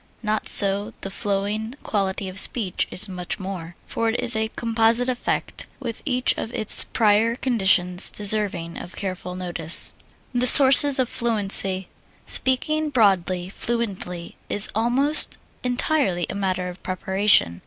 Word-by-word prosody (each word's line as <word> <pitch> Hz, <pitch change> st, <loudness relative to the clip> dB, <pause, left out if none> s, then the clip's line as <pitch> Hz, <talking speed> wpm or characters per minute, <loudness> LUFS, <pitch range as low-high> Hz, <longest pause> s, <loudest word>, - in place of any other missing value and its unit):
Not 215 Hz, 0 st, -4 dB
so 200 Hz, +2 st, +2 dB
the 195 Hz, -, -7 dB
flowing 205 Hz, +4 st, -5 dB
quality 195 Hz, -2 st, -4 dB
of 185 Hz, +1 st, 0 dB
speech 200 Hz, -6 st, +1 dB
is 185 Hz, -, -4 dB
much 180 Hz, -2 st, -7 dB
more, 185 Hz, -3 st, -9 dB
for 230 Hz, 0 st, -4 dB
it 225 Hz, -, -4 dB
is 245 Hz, -1 st, -1 dB
a 220 Hz, 0 st, -2 dB
composite 230 Hz, +1 st, -1 dB
effect, 250 Hz, -1 st, -5 dB
with 235 Hz, -5 st, -8 dB
each 255 Hz, -3 st, 0 dB
of 225 Hz, -, -7 dB
its 220 Hz, -3 st, +8 dB
prior 220 Hz, +1 st, 0 dB
conditions 190 Hz, -7 st, 0 dB
deserving 200 Hz, -5 st, -3 dB
of 175 Hz, -, -12 dB
careful 185 Hz, -2 st, -7 dB
notice. 175 Hz, -2 st, +1 dB, 0.4 s
The 245 Hz, 0 st, 0 dB
Sources 275 Hz, +1 st, +7 dB
of 260 Hz, -2 st, 0 dB
Fluency 195 Hz, -5 st, 0 dB, 0.4 s
Speaking 305 Hz, +4 st, -2 dB
broadly, 190 Hz, -8 st, -1 dB
fluency 195 Hz, -5 st, -6 dB
is 205 Hz, -, +6 dB
almost 260 Hz, +7 st, +5 dB, 0.3 s
entirely 250 Hz, -, -2 dB
a -, -, -8 dB
matter 185 Hz, -2 st, -4 dB
of 180 Hz, 0 st, -11 dB
preparation. 190 Hz, -, 0 dB
205 Hz, 135 wpm, -20 LUFS, 185-235 Hz, 0.4 s, its